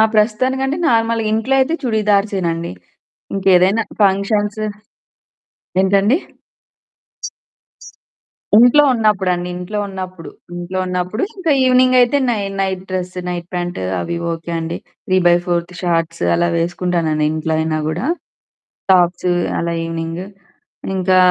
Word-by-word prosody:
ఆ! - - +7
ప్రస్తుతానికంటే 260 +6 +1
నార్మల్‌గా 225 -2 +1
ఇంట్లో 225 +5 0
అయితే 280 +5 +1
చుడిదర్సే‌నండి. 200 - 0 0.6
ఇంకేదైనా 195 +2 +3 0.2
ఫంక్షన్సు 205 +2 +1 1.1
ఏంటండి? 200 - +3 2.4
ఇంట్లో 245 +6 +7
ఉన్నప్పుడండి. 190 -5 +1
ఇంట్లో 180 +4 -4
ఉన్నప్పుడు. 185 -3 -7 0.2
ఇంట్లో 175 +2 -4
ఉన్నప్పుడు 180 +5 -2
ఇంకా 360 -4 -1
ఈవెనింగ్ 255 0 +4
అయితే 245 +3 +3
నై 225 -3 0 0.2
నైట్ 190 -1 -1
డ్రెస్, 180 -1 -3
నైట్ 175 -1 -4
ప్యాంట్ 175 0 -3 0.2
అవి 170 - -3 0.2
ఓకే 165 +1 -6
అండి. 165 +1 -3 0.3
3/4త్ 175 -1 +2
షార్ట్స్ 170 -1 -1
అలా 175 0 +2
వేసుకుంటానండి 170 -2 0
ఇంట్లో 160 0 -2
అయినా 160 0 -1
కూడా. 175 - -2 0.9
టాప్స్, 180 0 +3 0.3
అలా 170 0 -1
ఈవెనింగ్. 165 +1 -4 0.7
ఇంకా 185 0 +2
185 Hz, 105 wpm, -18 LUFS, 175-215 Hz, 2.4 s, ఆ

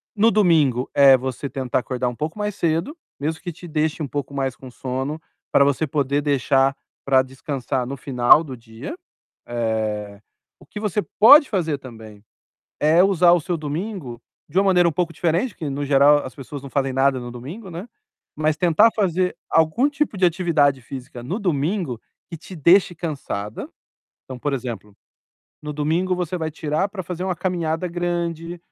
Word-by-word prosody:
No 220 +2 +4
domingo, 155 - +3
é 135 -1 +7
você 130 +2 -4
tentar 130 -1 -1
acordar 125 0 -2
um 120 - -7
pouco 155 - -4
mais 210 -1 -2
cedo, 170 - -1 0.2
mesmo 155 +3 -3
que 175 -1 -5
te 175 +2 -13
deixe 155 0 -1
um - - -3
pouco 140 0 -5
mais 135 -2 -2
com 130 - -11
sono, 130 +4 -4 0.3
pra 140 - +5
você 140 +2 +1
poder 140 0 0
deixar 135 -1 +2 0.3
pra 135 -1 +4
descansar 130 -1 -4
no 140 - -4
final 130 +3 +4
do 135 -4 -7
dia. 115 - -9 0.5
Eh, 110 -3 -2 0.4
o - - -17
que 210 - -8
você 210 -1 -1 0.2
pode 285 +7 +8
fazer 165 -7 -1
também 110 -5 -12 0.6
é 160 +5 +5
usar 180 -3 +4
o 175 - +4
seu 175 +2 -2
domingo 155 - -5 0.3
de 170 - -1
uma 195 - +4
maneira 180 -3 +4
um 165 - -1
pouco 170 +1 -1
diferente, 170 +9 0
porque 160 -8 -6
no 145 +1 -3
geral 145 +1 +5
as 130 - -9
pessoas 140 +1 -8
não 140 - -8
fazem 135 -1 0
nada 135 0 +2
no 120 - -7
domingo, 155 - -9
né. 175 +7 -7 0.5
Mas 155 0 +1
tentar 180 +7 +4
fazer 185 -3 0
algum 160 - +3
tipo 290 -6 -2
de 185 - +3
atividade 155 -7 +2
física 125 -1 -9
no 170 - -3
domingo 165 - -1 0.3
que 165 - -6
te 175 +3 -11
deixe 175 +4 +4
cansada. 135 - -5 0.6
Então, 130 -1 -8
por 145 +3 -2
exemplo, 120 -5 -5 0.7
no 150 - -5
domingo 165 +5 0
você 180 0 -3
vai 160 -1 -3
tirar 155 +4 -1
pra 195 -1 -6
fazer 180 +1 -5
uma 185 -2 -2
caminhada 170 -1 -2
grande, 170 -1 -3
150 Hz, 180 wpm, -22 LUFS, 130-175 Hz, 0.7 s, pode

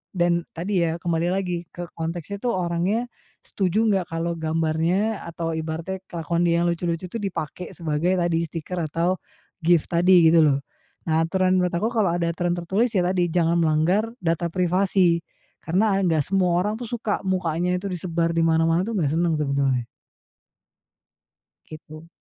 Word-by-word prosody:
Dan 175 -1 +1
tadi 180 +3 -1
ya, 160 - -1
kembali 170 0 -1
lagi 180 -2 -2
ke 175 -1 -7
konteksnya 170 +4 -5
itu 245 - -3
orangnya, 185 +2 0 0.4
setuju 195 +2 0
nggak 195 -5 +1
kalau 165 +1 -2
gambarnya 165 +6 0
atau 165 0 -3
ibaratnya 160 +4 -4
kelakuan 170 0 -2
dia 170 0 +2
yang 175 - +2
lucu-lucu 170 0 -2
itu 230 - -4
dipakai 180 -3 -5
sebagai, 165 +2 0
tadi, 170 -2 +1
stiker 165 +3 -5
atau 170 +4 0 0.4
gift 170 -2 +2
tadi, 175 -1 +5
gitu 165 - +6
loh. 140 -3 +3 0.4
Nah, 160 -1 +1
aturan, 185 +1 +2
menurut 180 -1 0
aku 215 +7 0
kalau 205 -8 +1
ada 170 -1 0
aturan 175 +1 -1
tertulis, 195 +7 0
ya 185 - +3
tadi, 180 0 +1
jangan 170 0 +1
melanggar 165 +7 +2 0.2
data 170 0 0
privasi, 180 0 +2 0.4
karena 195 +4 +1
nggak 165 -6 +2
semua 185 0 +1
orang 210 +2 -2
tuh 240 - -5
suka, 225 -3 -2
mukanya 180 -1 0
itu 190 +2 -4
disebar 170 -1 -1
di 165 - 0
mana-mana 165 +2 +2
tuh 230 - -3
nggak 155 -8 +1
senang 170 -2 +2
sebetulnya. 140 -4 0 1.8
Gitu. 155 +1 -11
170 Hz, 160 wpm, -24 LUFS, 165-185 Hz, 1.8 s, gitu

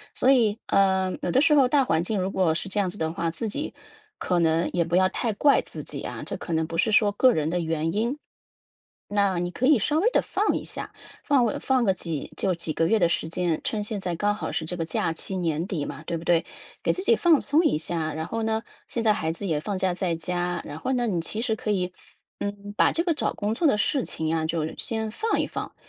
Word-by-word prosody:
所 260 - +4
以 225 -5 +3
呃， 190 -1 +2
有 - - -2
的 260 - +4
时 300 - +4
候， 275 -3 +6
大 275 +1 +3
环 165 -10 +1
境 205 +3 -1
如 185 +1 -1
果 180 -5 +2
是 170 - -3
这 195 +2 -1
样 195 -2 +1
子 180 - -6
的 160 -3 -1
话， 170 0 -1
自 170 +7 -4
己 285 +9 -4 0.4
可 180 -1 0
能 165 0 +2
也 175 - +2
不 170 +1 -1
要 185 +1 +5
太 230 +2 -1
怪 285 +7 +4
自 - - -8
己 - - -6
啊， - - -6
这 - - -4
可 - - -7
能 160 0 +1
不 165 - -6
是 220 - +2
说 210 -1 +4
个 255 +5 +4
人 155 -5 0
的 175 - 0
原 165 -1 -1
因。 235 +7 0 0.9
那 200 -3 +1
你 175 0 -2
可 255 +8 0
以 300 -2 +6
稍 295 +9 +1
微 420 +8 +3
地 - - +3
放 415 +2 0
一 - - -6
下， - - -5 0.3
放 275 -4 +3
个 220 - -1
放 260 -2 +2
个 190 - +3
几 165 -5 -5
就 185 -2 0
几 165 -2 -3
个 165 - +1
月 225 - +3
的 175 -5 +4
时 160 -1 -1
间， 170 -1 -1
趁 210 -2 -1
现 210 -1 -4
在 175 -2 -2
刚 205 +4 +1
好 210 - -4
是 160 - -2
这 180 - -3
个 165 - -1
假 165 0 -1
期 190 +4 -5
年 165 -1 -1
底 165 -8 -2
嘛， - - -7
对 170 - -1
不 165 - -8
对？ 170 -1 +3 0.4
给 - - +2
自 370 - -3
己 465 - +4
放 340 -8 +4
松 300 +4 +2
一 310 - +3
下， 155 0 -3
然 160 0 -3
后 225 +6 -3
呢， 220 0 0 0.2
现 235 - -2
在 215 -2 +5
孩 160 -6 -1
子 170 +5 -6
也 160 -5 0
放 200 +5 -3
假 185 -1 +1
在 175 -1 -1
家 175 +1 -2
然 145 +2 -7
后 260 - -2
呢， 245 -1 +1
你 185 -7 0
其 215 +6 -4
实 225 -1 0
可 215 - -5
以， 180 -3 0 0.5
嗯， 205 0 -5
把 - - +4
这 335 - 0
个 345 -2 +1
找 295 - -1
工 210 +1 -1
作 320 +8 +2
的 245 - +3
事 260 +5 +1
情 160 0 -2
啊 160 -1 0
就 160 -1 -2
先 220 -1 -2
放 445 - 0
一 - - +1
放。 - - -6
190 Hz, 285 characters per minute, -25 LUFS, 165-225 Hz, 0.9 s, 候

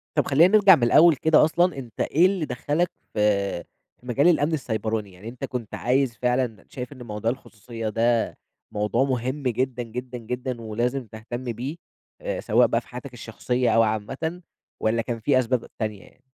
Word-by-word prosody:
طب - - +2
خلّينا 175 +9 +5
نرجع 195 -3 +8
من 120 - -2
الأول 160 +6 +6
كده 155 +3 +4
أصلًا، 175 -1 +1
أنتَ 120 -6 -9
إيه 170 +5 +3
اللي 185 -5 +1
دَخَّلك 145 +7 -1 0.2
في 100 -4 +1 0.4
في 125 - -21
مجال 140 +7 +3
الأمن 160 -2 +3
السِّيبراني، 110 -6 -2
يعني 95 +5 -10
أنتَ 125 +3 -6
كنت 125 -5 -6
عايز 125 -1 +1
فعلًا 125 -4 -1
شايف 125 +2 -7
إن 125 -2 -11
موضوع 110 0 -2
الخصوصيَّة 115 -2 -7
ده 115 +1 +1 0.3
موضوع 105 +5 +1
مُهم 130 +2 -2
جدًا، 125 +1 -1
جدًا، 125 +2 -6
جدًا، 125 +1 -4
ولازم 120 +3 -2
تهتمّ 115 +4 -7
بيه، 125 +6 -4 0.5
آآ - - -3
سواء - - +3
بقى - - 0
في - - -24
حياتك - - -9
الشَّخصيَّة 125 0 -1
أو 115 - +6
عامّةً، 130 - -3 0.4
والّا 115 +1 +1
كان 115 0 -4
في 130 +3 +3
أسباب 125 -1 0
تانية 105 -3 -3
يعني؟ 130 - -22
125 Hz, 175 wpm, -24 LUFS, 115-140 Hz, 0.5 s, نرجع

